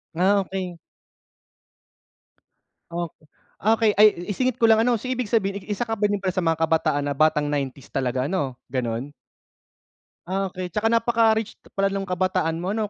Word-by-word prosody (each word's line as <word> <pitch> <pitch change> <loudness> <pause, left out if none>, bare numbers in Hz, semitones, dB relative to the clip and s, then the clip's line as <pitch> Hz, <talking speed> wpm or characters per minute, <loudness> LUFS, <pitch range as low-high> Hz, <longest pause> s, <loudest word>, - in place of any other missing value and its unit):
Ah, 190 +4 +3
okey. 185 -2 -5 2.1
Ok 170 -1 -4 0.5
okey, 220 +1 +3
ay 215 - +10 0.3
isingit 255 +3 0
ko 230 - +3
lang 225 -1 +6
ano, 240 0 +2
so 220 - -11
ibig 250 -3 -2
sabihin 200 -3 0
isa 210 +3 -1
ka 225 - -3
ba 210 -2 +1
din 205 - +1
sa 185 0 0
mga 165 -2 +1
kabataan 160 -3 +1
na 145 - -1
batang 150 +1 +2
90s 140 -2 -3
talaga 130 -1 0
'no, 140 -6 -2
gano'n? 125 +2 -3 1.1
Ah, 190 +1 -1
okey, 185 0 -5
tsaka 210 +5 0
napaka-rich 230 -2 +2 0.2
pala 195 0 +2
no'ng 195 0 -3
kabataan 180 -3 0
mo 185 +4 -2
'no, 215 -2 -1
190 Hz, 160 wpm, -24 LUFS, 160-220 Hz, 2.1 s, ay